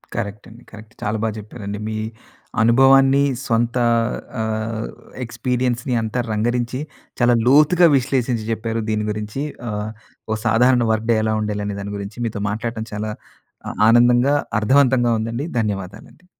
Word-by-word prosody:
Correct 105 -1 -4
అండి. 120 +2 -15
Correct. 110 0 -13
చాలా 105 +2 -1
బాగా 110 -1 0
జెప్పారండి. 105 -1 -7
మీ 110 - -3 0.6
అనుభవాన్ని 135 +4 +5 0.2
సొంత 115 0 +1 0.7
ఆహ్, 110 0 -2 0.4
ఎక్స్పీరియన్స్‌ని 125 +1 -1
అంతా 110 +2 -2
రంగరించి 120 +3 -1 0.4
చాలా 120 0 +5
లోతుగా 155 +6 +6
విశ్లేషించి 125 -3 -1
జెప్పారు 115 0 -2
దీని 105 -1 0
గురించి. 105 +6 -4 0.3
ఆహ్, 105 0 -3 0.4
ఓ - - +2
సాధారణ 120 +2 +4
వర్క్ 110 +1 -1
డే 115 - +3
ఎలా 110 0 +1
ఉండాలి 105 -1 -2
అనే 100 - -3
దాని 100 +1 -6
గురించి. 100 +3 -7
మీతో 105 -3 -3
మాట్లాడటం 110 +1 -3
చాలా 105 +1 -3 0.6
అ - - -2 0.2
ఆనందంగా, 120 +3 +5 0.3
అర్ధవంతంగా 125 +1 +3
ఉందండి. 115 +5 -3
ధన్యవాదాలు 100 -2 -4
అండి. 180 - -25
115 Hz, 140 wpm, -20 LUFS, 110-125 Hz, 0.7 s, లోతుగా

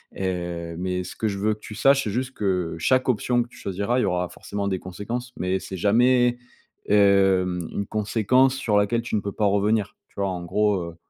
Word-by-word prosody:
et 85 -3 -3
mais 90 +1 -2
ce - - -8
que 110 - -1
je 100 - -4
veux 105 +2 +1
que 105 - -11
tu 105 - -10
saches, 140 +3 +4
c'est 105 - -3
juste 130 +3 -2
que 90 -6 -1
chaque 130 +9 +2
option 120 +1 +1
que 120 - -15
tu - - -18
choisiras, 100 +6 -1
il - - +2
y - - +2
aura 90 0 0
forcément 100 0 -5
des 95 -2 -1
conséquences, 115 +8 -6
mais 95 +1 -1
c'est 95 - -7
jamais, 120 +5 +3 0.5
hem, 95 -3 +3
une 100 - -3
conséquence 115 +5 +2
sur 115 -6 0
laquelle 105 +3 +1
tu 120 - -3
ne 105 - +1
peux 100 - -4
pas 105 - -1
revenir», 100 +1 +1
tu - - -32
vois? 100 -1 0
En 90 -2 -4
gros, 105 +4 +1 0.2
heu - - -17
100 Hz, 220 wpm, -24 LUFS, 95-115 Hz, 0.5 s, saches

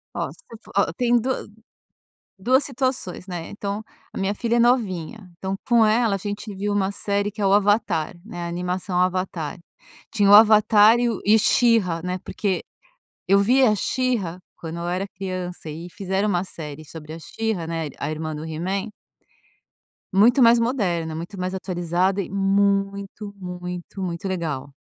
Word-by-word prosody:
Ó, - - -2
se - - -17
voce 230 - -11
for - - -16
ó, 200 - +3
tenho 240 +4 +2
do 260 - -2 1.1
2 255 +8 +3
situações, 255 -9 -3
né, 175 -3 -5
então, 205 +1 -4 0.3
a - - -7
minha 195 +1 0
filha 235 +2 -1
é - - +3
novinha, 210 -6 0
então, 190 +1 -3
com 235 -3 +5
ela 220 -1 +3
a - - -1
gente 205 +1 -5
viu 205 +2 -2
uma 195 -1 +1
série, 200 0 -1
que 215 - -15
é - - +2
o 195 - +4
Avatar, 205 -5 +2
né, 175 -6 -6
a - - -3
animação 180 +1 -2
Avatar, 180 -2 -1 0.5
tinha 205 -3 +3
o - - +8
avatar 215 +1 +7
e 245 - +2
o 225 - -2
e 215 +2 +6
She-Ra, 210 -8 +3
né, 180 0 -2
porque 195 -4 -2 0.6
eu 195 +1 +5
vi 250 +7 +4
a 220 -4 +5
She-Ra 210 -7 -1 0.2
quando 165 0 -6
eu 170 - -4
era 185 +3 -2
criança 185 -3 -6
e 165 +3 -7
fizeram 195 +2 -1
uma 180 -2 +1
série 155 -5 -8
sobre 155 0 -9
a 165 - -8
She-Ra, 205 0 -3
né, 165 -2 -2
a - - -2
irmã 155 0 -4
do 150 - -6
He-Man 185 +7 -3 1.2
muito 235 +7 +5
mais 235 0 +7
moderna, 185 -10 0
muito 175 +5 -7
mais 185 +1 -2
atualizada 185 +1 -1
e 185 - -6
muito, 200 +1 0
muito, 180 0 -7
muito 175 +1 -3
legal, 155 -7 -3
195 Hz, 175 wpm, -23 LUFS, 175-215 Hz, 1.2 s, o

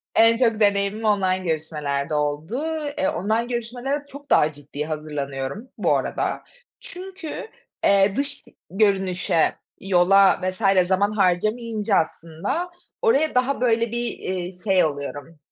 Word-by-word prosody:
En 230 0 +6
çok 230 -3 +2
deneyimim 200 +1 +2
online 190 -3 +2
görüşmelerde 150 -2 -2
oldu. 150 - -1 0.3
Eee, 285 0 +1
online 225 -3 0
görüşmelere 245 +4 -3
çok 285 +1 -12
daha 150 0 +4
ciddi 145 +1 -6
hazırlanıyorum 150 - -4
bu - - +2
arada. - - -2 0.4
Çünkü, 370 -2 -7 0.4
eee, 195 0 +4
dış 280 +1 -2 0.3
görünüşe, 190 -4 +1 0.3
yola 195 +1 +4
vs. 185 -1 +2
zaman 200 +2 +2
harcayamayınca 215 +2 +1
aslında 170 - -2 0.3
oraya 315 - +2
daha, 255 +1 +1
böyle, 230 -2 +2
bir, 240 0 -2
eee, 185 -1 -4
şey 190 -5 +3
oluyorum, 145 0 -4
ı 165 -2 -20
200 Hz, 125 wpm, -23 LUFS, 165-235 Hz, 0.4 s, En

